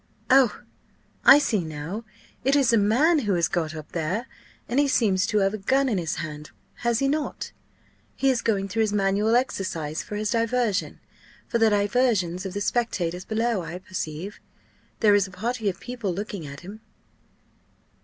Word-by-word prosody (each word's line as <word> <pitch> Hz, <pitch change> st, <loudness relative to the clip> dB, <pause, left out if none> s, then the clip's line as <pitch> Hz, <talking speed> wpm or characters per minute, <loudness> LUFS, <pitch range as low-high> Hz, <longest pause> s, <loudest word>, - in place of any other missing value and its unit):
Oh! 260 Hz, -4 st, +4 dB, 0.6 s
I 275 Hz, -, +9 dB
see 220 Hz, -10 st, +1 dB
now, 160 Hz, +8 st, -6 dB, 0.4 s
it 270 Hz, +3 st, +3 dB
is 270 Hz, -5 st, +3 dB
a -, -, +6 dB
man 275 Hz, +11 st, +3 dB
who 205 Hz, -8 st, 0 dB
has 170 Hz, -1 st, +2 dB
got 160 Hz, -2 st, -2 dB
up 155 Hz, -1 st, -9 dB
there, 180 Hz, +8 st, -2 dB, 0.4 s
and 250 Hz, -, +1 dB
he 290 Hz, -, +4 dB
seems 205 Hz, -8 st, +2 dB
to 215 Hz, -, 0 dB
have 195 Hz, -, 0 dB
a 215 Hz, -, -4 dB
gun 270 Hz, +7 st, +2 dB
in 215 Hz, -7 st, 0 dB
his 165 Hz, -1 st, -2 dB
hand, 150 Hz, -1 st, -6 dB, 0.3 s
has 235 Hz, +1 st, 0 dB
not 295 Hz, +2 st, -1 dB, 0.6 s
he? -, -, -4 dB
He -, -, +6 dB
is 245 Hz, -3 st, 0 dB
going 195 Hz, -3 st, 0 dB
through 215 Hz, +4 st, -1 dB
his 215 Hz, -2 st, +1 dB
manual 205 Hz, +3 st, +2 dB
exercise 170 Hz, -, -1 dB
for 210 Hz, -, -7 dB
his 210 Hz, 0 st, -1 dB
diversion 230 Hz, -3 st, 0 dB, 0.5 s
for 235 Hz, -, 0 dB
the 225 Hz, -1 st, +5 dB
diversion 205 Hz, -3 st, +2 dB
of 185 Hz, 0 st, -6 dB
the 205 Hz, -, -2 dB
spectators 185 Hz, -6 st, -1 dB
below, 225 Hz, -2 st, 0 dB
I 165 Hz, +1 st, -6 dB
perceive 185 Hz, 0 st, -6 dB, 0.6 s
there 210 Hz, -2 st, +6 dB
is 200 Hz, -1 st, +3 dB
a -, -, -13 dB
party 220 Hz, +3 st, -2 dB
of 190 Hz, -, -6 dB
people 245 Hz, -6 st, -4 dB
looking 195 Hz, -3 st, -5 dB
at 140 Hz, 0 st, -9 dB
him." 200 Hz, +5 st, -10 dB
205 Hz, 180 wpm, -25 LUFS, 180-235 Hz, 0.6 s, I